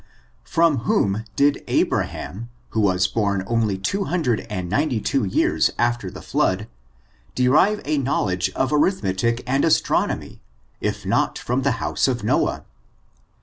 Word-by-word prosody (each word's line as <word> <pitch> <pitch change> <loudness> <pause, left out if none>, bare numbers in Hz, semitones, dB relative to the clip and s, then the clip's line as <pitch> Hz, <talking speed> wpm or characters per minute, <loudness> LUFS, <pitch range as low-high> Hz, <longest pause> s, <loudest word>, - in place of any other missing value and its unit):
From 165 -3 +2
whom 110 -2 0
did 140 +1 +2
Abrahauh 110 +6 -1 0.2
who 110 - -1
was 95 -2 +2
bom 100 -2 0
only 110 -3 0
two 195 - -2
hundred 150 -13 -1
and 95 -4 -3
ninety 125 - 0
two 135 +4 0
years 95 - +2
after 120 -4 0
the - - -10
flood, 95 +4 0 0.7
de< 125 0 +2
rive 190 +11 +4
a 150 -1 0
knowledge 105 -9 0
of 130 +2 0
arithmetic 115 - +1
and 135 +3 +1
astronomy, 165 - 0 0.4
if - - -3
not - - +1
from 125 +2 -1
the 135 -1 +1
house 115 - 0
of 125 -4 -1
Noah 105 - 0
120 Hz, 145 wpm, -22 LUFS, 100-140 Hz, 0.7 s, rive